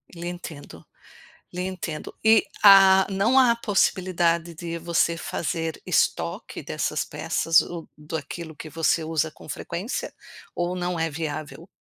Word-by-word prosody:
Lhe 170 Hz, +1 st, -6 dB
entendo 160 Hz, -, -8 dB, 0.7 s
lhe 180 Hz, -, -2 dB
entendo. 170 Hz, -4 st, -5 dB
E 220 Hz, -1 st, +5 dB, 0.2 s
há 195 Hz, -1 st, +8 dB
não 220 Hz, +7 st, +2 dB
há 250 Hz, -3 st, +6 dB
a -, -, +2 dB
possibilidade 175 Hz, -6 st, +1 dB
de 170 Hz, 0 st, -5 dB
você 170 Hz, 0 st, +1 dB
fazer 165 Hz, 0 st, -3 dB
estoque -, -, -1 dB
dessas -, -, -2 dB
peças 165 Hz, -1 st, +2 dB
ou 170 Hz, -2 st, -7 dB
daquilo 160 Hz, +1 st, -7 dB
que 155 Hz, +1 st, -9 dB
você 165 Hz, 0 st, +1 dB
usa 160 Hz, -1 st, -1 dB
com -, -, -16 dB
frequência, 175 Hz, -, -4 dB, 0.4 s
ou 175 Hz, +1 st, -1 dB
não 180 Hz, -1 st, -2 dB
é 165 Hz, -1 st, 0 dB
viável? 155 Hz, +2 st, -6 dB
170 Hz, 135 wpm, -24 LUFS, 160-185 Hz, 0.7 s, há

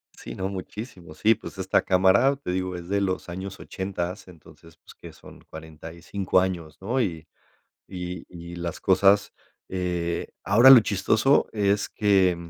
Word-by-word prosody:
Sí, -, -, -9 dB
no, 95 Hz, 0 st, -3 dB
muchísimo. 95 Hz, -3 st, -8 dB
Sí, 110 Hz, +7 st, +3 dB
pues 100 Hz, -, -11 dB
esta 95 Hz, 0 st, +1 dB
cámara, 95 Hz, +9 st, +3 dB
te 135 Hz, -10 st, -5 dB
digo, 90 Hz, 0 st, -2 dB
es 85 Hz, -1 st, -8 dB
de 100 Hz, 0 st, 0 dB
los 95 Hz, -2 st, -2 dB
años 95 Hz, +2 st, -7 dB
ochentas. 95 Hz, 0 st, -5 dB
Entonces, 80 Hz, -1 st, -17 dB
pues, -, -, -18 dB
que -, -, -12 dB
son -, -, -15 dB
45 80 Hz, +4 st, -3 dB
años, 85 Hz, -5 st, -3 dB
¿no? 120 Hz, +7 st, -1 dB
Y 80 Hz, -7 st, -4 dB, 0.6 s
y 90 Hz, -2 st, -7 dB
y 85 Hz, 0 st, -10 dB
las 85 Hz, 0 st, -5 dB
cosas, 100 Hz, +2 st, +3 dB, 0.4 s
eh, 90 Hz, -2 st, -3 dB
ahora 115 Hz, +7 st, +6 dB
lo 130 Hz, -3 st, +10 dB
chistoso 110 Hz, +6 st, +2 dB
es 100 Hz, -1 st, 0 dB
que, 95 Hz, -4 st, +2 dB
95 Hz, 155 wpm, -25 LUFS, 85-100 Hz, 0.6 s, lo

